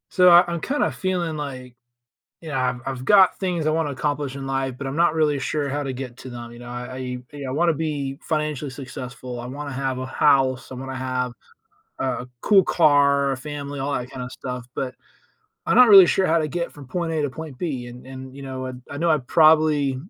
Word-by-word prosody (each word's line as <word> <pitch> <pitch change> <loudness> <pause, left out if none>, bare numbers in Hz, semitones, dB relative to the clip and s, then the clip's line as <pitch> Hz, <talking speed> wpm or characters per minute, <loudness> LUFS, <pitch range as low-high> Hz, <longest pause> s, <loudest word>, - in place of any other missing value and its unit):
So, 180 -1 +5
I 175 0 +9
I'm 170 - -2
kinda 285 - 0
feeling 175 -4 -2
like, 130 -4 -6 0.7
you 165 - -8
know, 150 - -4
I've 125 -1 -1
I've 130 -1 -4
got 195 0 +5
things 180 -4 -1
I - - +3
wanna 155 -2 0
accomplish 140 0 -2
in 135 -1 -6
life, 135 -1 -2
but 140 - -6
I'm 135 +1 -4
not 170 -1 +4
really 150 -3 +1
sure 145 +1 -2
how 145 +2 -2
to 135 -2 -3
get 125 -2 -7
to 130 - -9
them. 120 -1 -8
You 120 - -12
know? 120 - -10
I 125 +1 -5
I 140 -2 -6
wanna 170 +5 +2
be 145 -3 -3
financially 150 -3 -2
successful. 125 -2 -7
I 120 - -6
wanna 140 +3 -6
have 135 -1 -2
a 130 - -4
house. 130 -1 +2
I - - -6
wanna 135 +1 -6
have 130 -1 -2 0.7
a 130 -1 -2
cool 200 -2 +6
car, 140 -4 +3
a - - -2
family, 145 0 -6
all 140 +2 -2
that 125 +1 -4
kind 130 -2 -7
of 125 - -6
stuff. 125 -1 -6
But 130 -2 -3 0.7
I'm - - +1
not 250 -1 +8
really 195 -3 +10
sure 190 +2 +2
how 165 0 +3
to 155 -1 -1
get 170 +3 -3
from 145 -3 -12
point 170 +3 -2
A 155 -1 0
to 145 - -1
point 155 0 -8
B. 130 -6 -3
And 120 +1 -11
and, 130 0 -10
you 140 - -9
know, 130 -1 -5
and 130 0 -8
I 145 - -6
know 170 +2 +2
I 155 - +4
probably 155 -1 +4
140 Hz, 225 wpm, -23 LUFS, 130-155 Hz, 0.7 s, really